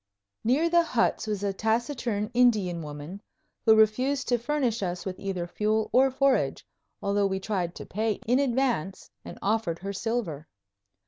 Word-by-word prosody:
Near 270 +9 +3
the 340 0 +4
huts 245 -8 0
was 205 -2 -2
a 200 -1 0
taciturn 225 0 -1
Indian 210 -9 +3
woman, 150 +6 -8 0.5
who 220 - +8
refused 255 +6 +2
to 245 -1 +2
furnish 245 -3 -1
us 180 -2 -3
with 185 -1 -5
either 190 -3 -3
fuel 215 +4 -1
or 265 +2 +5
forage, 260 - +1 0.4
although 200 0 +2
we 190 0 -2
tried 185 -4 -2
to - - -8
pay 215 +2 -1
in 245 +4 +3
advance 245 - -1
and - - -9
offered 205 -5 0
her 195 +3 -5
silver. 190 -8 -3
215 Hz, 155 wpm, -27 LUFS, 190-245 Hz, 0.5 s, who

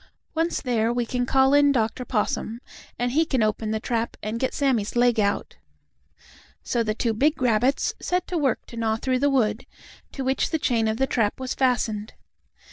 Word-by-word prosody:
Once 330 +1 0
there, 235 -3 +1
we 240 0 -1
can 245 +1 -2
call 265 +1 +4
in 285 0 +5
Dr. 230 -1 0
Possum, 225 0 -2 0.4
and 245 0 -1
he 310 +5 +3
can 265 -7 0
open 215 0 -1
the 220 0 -1
trap 230 +1 -2
and 215 +2 -3
get 260 - 0
Sammie's 250 -8 0
leg 240 -1 +3
out." 200 -1 -1 1.1
So 240 - 0
the 215 -2 -1
two 230 0 0
big 290 +8 +1
rabbits 250 +2 +2
set 360 0 -1
to 360 - -3
work 270 -5 0
to 235 - -11
gnaw 220 -1 0
through 255 +3 -1
the 285 +2 +3
wood, 230 -4 0 0.5
to 270 - -4
which 265 +1 0
the 320 - 0
chain 235 -6 +1
of 220 0 -1
the 265 - +2
trap 225 -5 0
was 260 -1 -3
fastened. 220 -5 0
245 Hz, 195 wpm, -24 LUFS, 220-265 Hz, 1.1 s, in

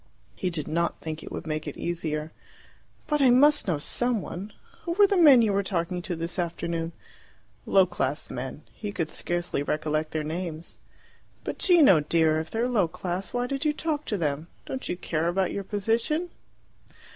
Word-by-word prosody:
He 185 - -1
did 160 -4 -4
not 170 +2 -1
think 160 -1 -5
it - - -9
would - - -5
make 155 -1 -3
it - - -6
easier. 160 -2 -3 0.7
"But 300 -1 +1
I 265 - +6
must 290 +3 +5
know 170 -5 +1
some 240 +10 +1
one! 195 +2 -7 0.3
Who 340 - -2
were 405 +3 +6
the 400 - +1
men 290 -9 +8
you 210 -3 +2
were 200 - +2
talking 180 -2 -2
to 175 -1 -4
this 165 +3 -4
afternoon?" 170 -1 -2 0.8
Low 190 -1 +6
class 175 -4 -2
men. 135 +4 -6
He 210 -2 -5
could 165 -5 -2
scarcely 175 -2 -2
recollect 155 +1 -1
their 155 -1 -2
names. 165 +1 -5 0.7
"But, - - -5
Gino 315 - +6
dear, 155 +1 +2
if 160 0 -5
they're 230 +2 0
low 215 -8 +2
class, 180 +3 -4
why 245 0 -1
did 275 +3 -3
you 300 -1 +2
talk 305 -1 -2
to 210 - -1
them? 155 -1 -2 0.2
Don't 265 - -5
you 175 - -2
care 165 -2 -1
about 185 +1 +1
your 200 - -3
position?" 225 - 0
180 Hz, 185 wpm, -27 LUFS, 160-240 Hz, 0.8 s, men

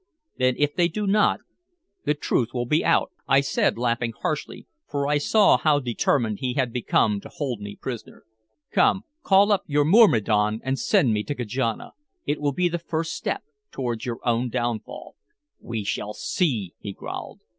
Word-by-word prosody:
"Then 130 -1 +3
if 145 0 +1
they 175 -2 +3
do 210 +4 -3
not, 210 +2 +3 0.6
the 150 - +2
truth 120 -4 -1
will 120 0 -1
be 150 +7 +2
out," - - +2 0.2
I 135 0 +5
said 140 - +1
laughing 120 -1 -1
harshly, 150 -1 -3 0.2
for 140 -1 -1
I 145 0 +2
saw 210 +7 +4
how 150 -2 +3
determined 120 -3 0
he 125 -1 -2
had 130 -4 0
become 105 -4 +1
to - - -11
hold 130 -7 -4
me 100 0 -7
prisoner. 125 -4 -7 0.5
"Come, 195 - +3 0.2
call 200 -2 +4
up 200 - +3
your 145 0 +2
myrmidon 110 - +4
and 135 0 -1
send 190 - +3
me 105 - 0
to 145 - -3
Kajana. 120 -1 -2 0.3
It 145 +1 -1
will 145 -1 +1
be 180 +6 +1
the 175 0 -2
first 165 -1 -3
step - - -3 0.3
towards 120 -3 -4
your 120 -3 -3
own 120 +1 +1
downfall." 120 -2 -4 0.4
"We 115 -3 -4
shall 105 +1 -3
see," 120 - -1
he 100 - -6
growled. - - -7
130 Hz, 175 wpm, -24 LUFS, 115-150 Hz, 0.6 s, I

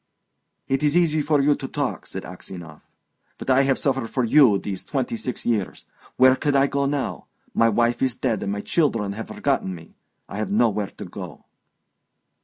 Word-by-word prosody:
"It 135 0 0
is 150 +2 +3
easy 155 -3 +3
for 150 -1 +2
you 145 +1 +4
to 135 - -5
talk," 145 -2 -3
said 95 - -6
Aksionov, 85 -3 -9 0.6
"but - - -2
I 130 +1 +5
have 135 - +3
suffered 135 -4 -1
for 130 - 0
you 120 -3 +6
these 95 -2 -5
twenty 130 -4 -2
six 125 +2 -5
years. 110 -6 -1 0.3
Where 130 0 +7
could 145 +1 0
I 135 0 +5
go 140 0 0
to - - 0
now?... 145 -2 -3 0.3
My 115 - +4
wife 120 +2 +1
is 130 -2 +1
dead, 115 -6 -1
and 100 - -2
my 100 0 -3
children 115 -12 0
have 110 +3 -6
forgotten 95 - -1
me. 80 -1 -13 0.3
I - - -7
have 105 -2 -2
nowhere 105 -2 +2
to - - -6
go..." - - -9
125 Hz, 195 wpm, -23 LUFS, 105-140 Hz, 0.6 s, Where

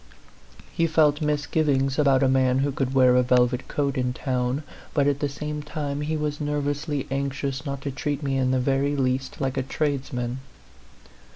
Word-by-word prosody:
He 165 - +2
felt 155 -1 +3
misgivings 145 -2 +1
about 140 -2 +4
a - - +4
man 130 -1 +3
who 140 +1 +1
could 135 -1 -2
wear 130 -1 +6
a 125 - +5
velvet 125 0 +2
coat 140 -2 -1
in 125 0 0
town, 125 +1 -1 0.3
but 145 -2 +3
at 140 -1 +1
the 145 - 0
same 150 +1 -5
time 145 -1 -4
he 155 +1 -1
was 150 -1 -2
nerv 145 -1 -1
ously 145 -1 -2
anxious 140 +1 -2
not 140 -1 -4
to 140 - -3
treat 145 +2 -3
me 135 -1 0
in 130 -1 +1
the 130 0 +2
very 135 +2 +1
least 130 -1 -1
like 135 -1 -1
a - - +2
tradesman. 130 -3 -2
140 Hz, 185 wpm, -25 LUFS, 130-145 Hz, 0.3 s, wear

